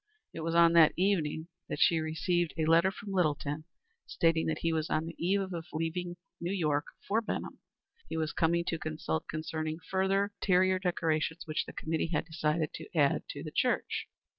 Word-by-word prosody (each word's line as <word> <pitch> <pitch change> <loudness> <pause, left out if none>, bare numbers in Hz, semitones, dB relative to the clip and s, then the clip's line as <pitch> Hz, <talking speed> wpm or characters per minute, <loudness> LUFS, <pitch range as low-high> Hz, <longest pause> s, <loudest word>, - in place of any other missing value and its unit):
It - - -6
was 165 +1 -2
on 170 0 +6
that 165 -2 +7
evening 165 -4 +1 0.2
that - - -2
she 165 0 +5
received 160 +2 0
a 160 - +1
letter 165 +3 +5
from 200 +1 -8
Littleton, 155 -4 0 0.4
stating 165 -1 +2
that 160 -1 0
he 165 -1 +1
was 160 0 -1
on 155 - 0
the 165 - -6
eve 190 +1 0
of 165 0 -5
leaving 175 +3 -3 0.2
New 170 +2 -2
York 150 -6 0 0.2
for 220 +3 +2
Benham. 220 - -4 0.5
He - - -3
was 155 -1 -1
coming 170 +1 +2
to 165 - -2
consult 155 - -3
concerning 155 0 -3
certain 165 - -17
further 195 +2 +2
interior 185 0 +3
decorations 165 -2 0
which 155 -1 -1
the - - -8
committee 160 +1 -2
had 150 - 0
decided 155 -1 -1
to - - -8
add - - +3
to - - -6
the - - -6
church. - - 0
165 Hz, 190 wpm, -31 LUFS, 155-180 Hz, 0.5 s, that